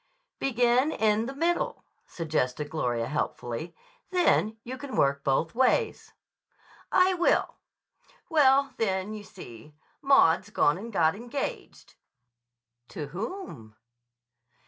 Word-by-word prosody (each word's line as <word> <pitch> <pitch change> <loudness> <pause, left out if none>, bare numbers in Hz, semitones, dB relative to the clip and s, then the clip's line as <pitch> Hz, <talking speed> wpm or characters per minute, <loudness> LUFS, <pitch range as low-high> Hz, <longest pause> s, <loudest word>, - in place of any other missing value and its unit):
"Begin 245 +2 +2
in 220 -1 +1
the 270 - -6
middle," 335 +4 -1 0.2
suggested 150 -3 -2
Gloria 120 -7 -1
helpfully. 150 +2 -4 0.3
"Then 285 - +2
you 255 +2 -6
can 265 +1 -7
work 140 0 +2
both 150 +4 0
ways." 260 +2 +1 0.8
"I 370 0 +4
will. 350 -1 +1 0.7
Well, 275 -4 +4
then, 195 -1 -1
you 210 -1 -7
see, 120 - -13 0.3
Maud's 210 - +4
gone 160 -5 +2
and 230 +3 -8
got 160 -5 +3
engaged." 240 +6 -6 0.9
"To 145 -2 -7
whom?" 190 - -7
215 Hz, 105 wpm, -27 LUFS, -, 0.9 s, I